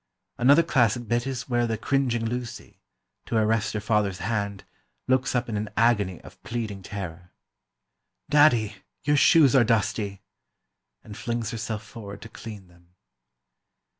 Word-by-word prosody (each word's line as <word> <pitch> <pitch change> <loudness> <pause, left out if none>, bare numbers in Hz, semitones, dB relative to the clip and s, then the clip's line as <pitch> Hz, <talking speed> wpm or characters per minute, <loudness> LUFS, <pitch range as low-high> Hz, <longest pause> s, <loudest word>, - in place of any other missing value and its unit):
Another 140 +7 +6
classic 120 -6 +1
bit 120 +3 0
is 130 -2 -4
where 120 -2 +1
the 115 -1 -1
cringing 125 -3 0
Lucy, 120 0 -5 0.5
to 115 - 0
arrest 110 -1 +1
her - - 0
father's 105 -2 0
hand, 100 0 -3 0.4
looks 130 0 +1
up 125 0 0
in 115 - -3
an 105 +1 -3
agony 105 -6 +2
of - - -15
pleading 110 -4 -4
terror: 90 -3 -7 1.0
"Daddy, 125 -9 +4 0.3
your 145 +1 +2
shoes 145 -2 +6
are 130 - +7
dusty!" 105 -3 0 0.8
And 105 - -10
flings 115 +1 -3
herself 110 -2 -4
forward 100 -2 -10
to 115 - -10
clean 105 -4 -10
them. 85 0 -24
115 Hz, 140 wpm, -26 LUFS, 100-120 Hz, 1.0 s, are